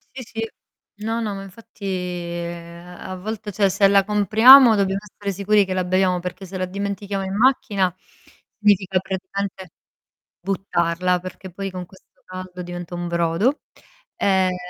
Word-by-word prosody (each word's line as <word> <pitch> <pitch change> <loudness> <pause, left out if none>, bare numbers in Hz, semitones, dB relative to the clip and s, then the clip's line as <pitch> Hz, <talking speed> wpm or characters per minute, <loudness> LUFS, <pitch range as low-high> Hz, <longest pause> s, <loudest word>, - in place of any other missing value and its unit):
Sì, 260 - -6
sì. 225 0 -5 0.6
No, 230 +1 -1
no, 210 -2 -2
ma 195 - -7
infatti, 205 +1 -12
ehm, 175 -1 -5
a 185 - -6
volte 210 +2 -5
cioè 200 0 +2
se 195 +1 +4
la 195 0 +5
compriamo 220 +5 +7
dobbiamo 195 -1 +1
stare 200 0 -5
sicuri 200 +2 +3
che 185 - -3
la 185 -1 -1
beviamo 185 0 +2
perché 180 +2 -6
se 190 +1 -7
la 185 - -1
dimentichiamo 200 +1 -4
in 190 +1 -4
macchina, 210 -7 +2 0.6
significa 195 -3 +3
praticamente 190 -1 -5 0.7
buttarla, 180 -1 0
perché 185 +1 -9
poi 195 +2 -5
con 180 -1 -6
questo 190 +2 -22
caldo 185 0 -8
diventa 175 0 -7
un 175 0 -4
brodo. 170 - +1 0.6
Ehm 190 - +2
190 Hz, 150 wpm, -22 LUFS, 180-205 Hz, 0.7 s, compriamo